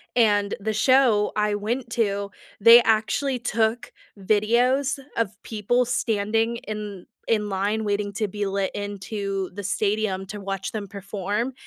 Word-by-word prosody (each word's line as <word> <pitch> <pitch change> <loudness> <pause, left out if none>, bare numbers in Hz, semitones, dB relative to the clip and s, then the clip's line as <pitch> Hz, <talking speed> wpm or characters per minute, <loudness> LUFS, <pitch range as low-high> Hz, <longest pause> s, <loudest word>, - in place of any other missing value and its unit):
and 205 -4 +3
the 215 +2 -2
show 235 -2 +4
I 210 0 +1
went 230 +4 -3
to, 200 -4 -1 0.3
they 230 +3 +9
actually 235 +4 +1
took 225 +1 -1 0.3
videos 245 +8 +2 0.2
of 215 -3 -2
people 230 +3 0
standing 225 -1 0
in 210 -4 -7 0.2
in 210 -2 +1
line 205 +3 -1
waiting 205 -1 -1
to 215 +1 -2
be 205 +1 -3
let 195 0 -1
into 200 -1 -4
the 205 - -6
stadium 200 0 -1
to 205 +1 -8
watch 195 -1 -4
them 210 -2 -5
perform, 205 +4 -3
210 Hz, 140 wpm, -24 LUFS, 200-230 Hz, 0.3 s, they